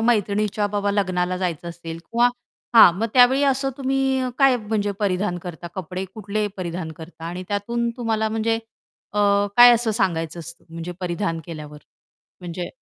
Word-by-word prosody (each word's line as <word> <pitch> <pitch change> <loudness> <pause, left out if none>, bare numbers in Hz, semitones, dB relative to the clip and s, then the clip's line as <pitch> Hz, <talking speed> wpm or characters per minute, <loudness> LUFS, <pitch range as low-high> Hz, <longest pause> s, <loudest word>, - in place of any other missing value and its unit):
मैत्रिणीच्या 210 -2 +1
बाबा 205 0 -1
लग्नाला 185 -3 0
जायचं 170 -2 -3
असेल 165 -1 -7
किंवा 235 +7 +2 0.5
हां, 200 -6 +9
मग 225 - +1
त्यावेळी 255 +3 +6
असं 270 0 +1
तुम्ही 270 -1 0 0.2
काय 270 -2 +5
म्हणजे 210 -2 -2
परिधान 190 -2 0
करता? 175 -1 -7
कपडे 185 0 -4
कुठले 210 -1 -2
परिधान 170 -2 -4
करता 160 +1 -11
आणि 175 +2 -5
त्यातून 235 +4 -1
तुम्हाला 220 -2 0
म्हणजे 225 +1 0 0.6
अ, 210 - -2 0.4
काय 245 0 +10
असं 230 -1 0
सांगायचं 170 -6 -1
असतं 170 +1 -9
म्हणजे 165 +2 -6
परिधान 175 -2 -2
केल्यावर? 150 -2 -8 0.6
म्हणजे 175 0 -5
200 Hz, 150 wpm, -22 LUFS, 175-225 Hz, 0.6 s, काय